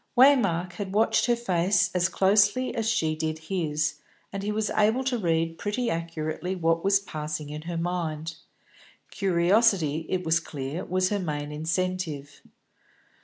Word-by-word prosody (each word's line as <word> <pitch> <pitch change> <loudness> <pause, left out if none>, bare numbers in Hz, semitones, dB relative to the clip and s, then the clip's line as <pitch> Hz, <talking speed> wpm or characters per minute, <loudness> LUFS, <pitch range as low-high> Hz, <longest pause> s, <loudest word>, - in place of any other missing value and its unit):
Waymark 195 -10 +4
had 195 -2 -5
watched 220 +4 +3
her 240 - +3
face 190 -4 +1
as 180 0 +2
closely 205 +6 +3
as 225 -2 -1
she 160 -9 +1
did 155 0 -2
his, 155 -2 -2 0.3
and 195 - -3
he 205 +1 -2
was 215 0 -1
able 220 +5 +2
to 255 -2 0
read 165 -3 0
pretty 230 +3 -1
accurately 165 +2 -3
what 165 -1 +1
was 195 0 +4
passing 155 -5 -5
in 150 0 -6
her 170 - -3
mind. 165 -2 -3 0.7
Curiosity, 175 -4 +2
it 185 -1 -1
was 165 0 +3
clear, 145 +1 -5
was 185 +1 +1
her 205 - 0
main 150 -4 -3
incentive. 160 -2 -3
175 Hz, 150 wpm, -26 LUFS, 160-205 Hz, 0.7 s, Waymark